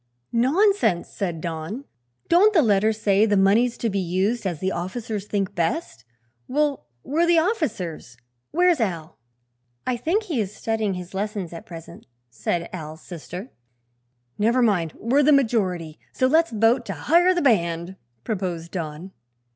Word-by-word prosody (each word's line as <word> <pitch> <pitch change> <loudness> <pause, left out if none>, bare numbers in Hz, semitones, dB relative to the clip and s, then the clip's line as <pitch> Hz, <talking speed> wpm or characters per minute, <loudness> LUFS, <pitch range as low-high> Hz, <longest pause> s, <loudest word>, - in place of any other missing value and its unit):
"Nonsense," 285 - +2
said 175 -5 -4
Don. 170 - -5 0.4
"Don't 400 +5 +5
the 325 - +6
letter 215 -1 +3
say 210 -1 +2
the 205 -1 +2
money's 220 +6 +3
to 235 - -1
be 200 -2 -1
used 190 +5 0
as 170 -5 -3
the 190 0 -1
officers 205 +3 -4
think 200 -3 -1
best? 165 - -2 0.4
Well, 290 0 0 0.2
we're 330 +4 +1
the 340 -1 +4
officers. 225 - -2 0.3
Where's 350 -1 +3
Al?" 170 -8 -3 0.7
"I 250 -1 0
think 345 - 0
he 320 - -1
is 205 0 -5
studying 220 -3 -1
his 180 +1 -8
lessons 200 -2 -3
just 170 - -7
at - - -20
present," 165 0 -11 0.2
said 170 +8 -2
Al's 160 -2 -7
sister. 180 - -8 0.9
"Never 235 +4 +3
mind; 180 -8 +1
we're 260 +6 +2
the 295 +1 +4
majority; 190 - +1
so 255 - +1
let's 320 +5 +4
vote 225 +3 +2
to - - -3
hire 350 +3 +3
the 350 - +1
band," 170 -7 +1 0.3
proposed 175 - -3
Don. 165 +1 -5
210 Hz, 155 wpm, -23 LUFS, 175-260 Hz, 0.9 s, the